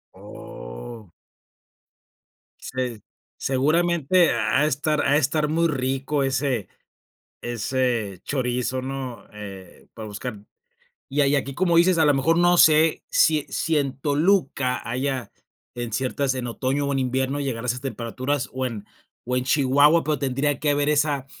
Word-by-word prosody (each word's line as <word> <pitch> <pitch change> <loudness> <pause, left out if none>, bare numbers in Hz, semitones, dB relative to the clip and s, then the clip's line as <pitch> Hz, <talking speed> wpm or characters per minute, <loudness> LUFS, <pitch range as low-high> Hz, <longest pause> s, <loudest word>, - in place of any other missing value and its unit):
Oh. - - -10 1.5
Se 125 -4 -4 0.4
seguramente 165 +5 +2
ha 110 +6 +1
de 150 - +3
estar 150 +1 0
ha - - +3
de - - +5
estar 150 +1 +1
muy 165 +2 +2
rico 135 0 -1
ese 135 -5 -1 0.7
ese 120 -4 -1
chorizo, 125 -1 -1
¿no? 130 -4 -6
Eh, 100 -3 -11
para 110 -1 -8
buscar 105 +1 -6 0.7
y 145 +2 +2
hay 140 +1 +3
aquí 140 0 -2
como 175 +2 +2
dices, 180 +1 +4
a 160 - +5
lo 145 -1 +4
mejor 150 +5 +2
no 175 0 +4
sé 155 0 +5
sí 155 -2 +3
sí 160 -1 0
en 140 -2 -2
Toluca 145 -4 +1
haya 130 +1 -2 0.4
en 120 -2 -5
ciertas 130 +2 -1
en 125 -2 -4
otoño 135 +4 -1
o 140 - -1
en 135 - 0
invierno 130 +2 -1
llegar 125 -4 -3
a - - -3
esas 125 +1 -1
temperaturas 130 +1 -3
o 130 0 -2
en 110 -5 -6 0.4
o 125 +1 -1
en 125 - 0
Chihuahua, 145 +4 +4
pero 150 -1 0
tendría 135 +1 0
que 150 - 0
haber 145 0 +1
esa 145 -2 +1
135 Hz, 150 wpm, -23 LUFS, 125-150 Hz, 1.5 s, de